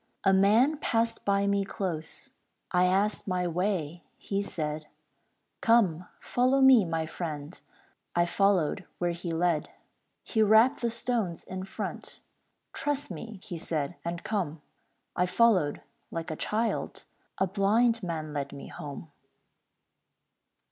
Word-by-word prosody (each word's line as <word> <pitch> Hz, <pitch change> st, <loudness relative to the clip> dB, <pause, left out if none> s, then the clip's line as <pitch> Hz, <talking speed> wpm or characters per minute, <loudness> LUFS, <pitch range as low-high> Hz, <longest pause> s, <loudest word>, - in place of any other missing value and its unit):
A 195 Hz, -, +5 dB
man 220 Hz, +10 st, +4 dB
passed 230 Hz, -5 st, 0 dB
by 200 Hz, 0 st, +2 dB
me 200 Hz, 0 st, +2 dB
close, 180 Hz, -5 st, -4 dB, 0.4 s
I 180 Hz, 0 st, +4 dB
asked 195 Hz, +4 st, +1 dB
my 180 Hz, -1 st, 0 dB
way, 175 Hz, -2 st, -1 dB
he 200 Hz, 0 st, -2 dB
said, 155 Hz, -5 st, -4 dB, 0.7 s
"Come, 190 Hz, -7 st, +3 dB
follow 255 Hz, +2 st, +2 dB
me, 265 Hz, -6 st, +7 dB
my 165 Hz, -1 st, -1 dB
friend" 155 Hz, -1 st, -6 dB, 0.5 s
I 175 Hz, 0 st, +4 dB
followed 185 Hz, -3 st, +2 dB
where 175 Hz, -1 st, 0 dB
he 170 Hz, 0 st, -5 dB
led. 165 Hz, -1 st, +1 dB, 0.5 s
He 220 Hz, -, 0 dB
rapped 220 Hz, +4 st, +5 dB
the 235 Hz, -, +1 dB
stones 225 Hz, -6 st, -1 dB
in 185 Hz, 0 st, -6 dB
front, 190 Hz, -, -5 dB, 0.5 s
"Trust 290 Hz, -5 st, -1 dB
me," 200 Hz, +4 st, -8 dB
he 175 Hz, -4 st, -6 dB
said, 155 Hz, -1 st, -2 dB
"and 170 Hz, 0 st, -4 dB
come"; 165 Hz, -8 st, -2 dB, 0.5 s
I 180 Hz, 0 st, +2 dB
followed 185 Hz, -8 st, +3 dB, 0.3 s
like 165 Hz, -1 st, -4 dB
a -, -, -3 dB
child 220 Hz, +7 st, -2 dB, 0.3 s
A 190 Hz, -, +3 dB
blind 220 Hz, +5 st, +2 dB
man 160 Hz, -4 st, -4 dB
led 140 Hz, -2 st, -3 dB
me 140 Hz, -, -9 dB
home. 145 Hz, +1 st, -8 dB
185 Hz, 130 wpm, -29 LUFS, 165-220 Hz, 0.7 s, me